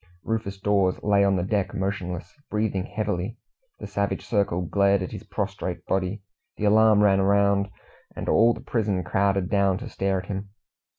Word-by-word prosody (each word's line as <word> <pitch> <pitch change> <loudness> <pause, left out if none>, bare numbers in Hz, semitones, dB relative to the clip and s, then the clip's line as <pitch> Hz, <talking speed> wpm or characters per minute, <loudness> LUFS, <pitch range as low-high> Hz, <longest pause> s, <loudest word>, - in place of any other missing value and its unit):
Rufus 110 -3 -3
Dawes 95 -2 +1
lay 100 -1 +4
on 100 -1 +3
the 90 - 0
deck 100 -1 -1
motionless, 95 -2 -3 0.2
breathing 105 -3 -1
heavily. 105 -1 -3 0.4
The - - -8
savage 100 0 -2
circle 100 -5 0
glared 100 +2 +2
at 90 - -6
his - - -7
prostrate - - -4
body. 95 +2 -1 0.3
The 105 - -1
alarm 105 0 +5
ran 95 -1 +4
round, 100 0 +3 0.5
and - - -5
all 115 +1 +4
the 115 - -10
prison 105 -7 -1
crowded 95 +1 +1
down 100 -1 +2
to 125 +5 -7
stare 95 -2 -1
at - - -14
him. 100 0 -5
100 Hz, 170 wpm, -25 LUFS, 95-105 Hz, 0.5 s, alarm